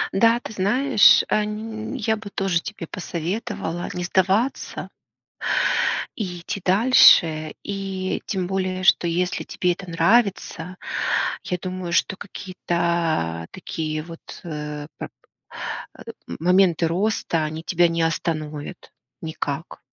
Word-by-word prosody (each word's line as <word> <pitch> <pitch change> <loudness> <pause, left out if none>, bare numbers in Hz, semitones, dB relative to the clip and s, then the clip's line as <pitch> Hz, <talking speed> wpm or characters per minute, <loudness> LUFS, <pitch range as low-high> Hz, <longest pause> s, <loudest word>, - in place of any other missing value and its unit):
Да, 230 +4 +5
ты 230 - -8
знаешь, 220 +5 +5
а, 215 - +2
ни 220 +3 -5
я 220 -2 +1
бы 215 -1 -9
тоже 190 -4 0
тебе 210 -5 -6
посоветовала 175 +1 -4
не 180 - -2
сдаваться 190 +8 0 1.3
и 180 -5 -4
идти 185 +3 -4
дальше. 180 -7 +6
И, 195 -2 -3
тем 190 -4 -1
более, 185 -1 -2
что 180 - +5
если 180 +2 0
тебе 180 - 0
это 185 +1 -10
нравится, 185 -1 +1 0.7
я 180 - -2
думаю, 185 -1 -5
что 190 - +2
какие-то 170 - -2
такие 155 -4 -4
вот, 165 0 -10 0.2
э, 150 -3 -5
прап - - -7 0.9
э, - - -13 0.3
моменты 175 -1 +3
роста- 175 -2 0
они 155 +1 -5
тебя 175 0 +3
не 165 0 0
остановят 155 0 -3 0.3
никак. 160 -1 -4
180 Hz, 115 wpm, -23 LUFS, 165-200 Hz, 1.3 s, дальше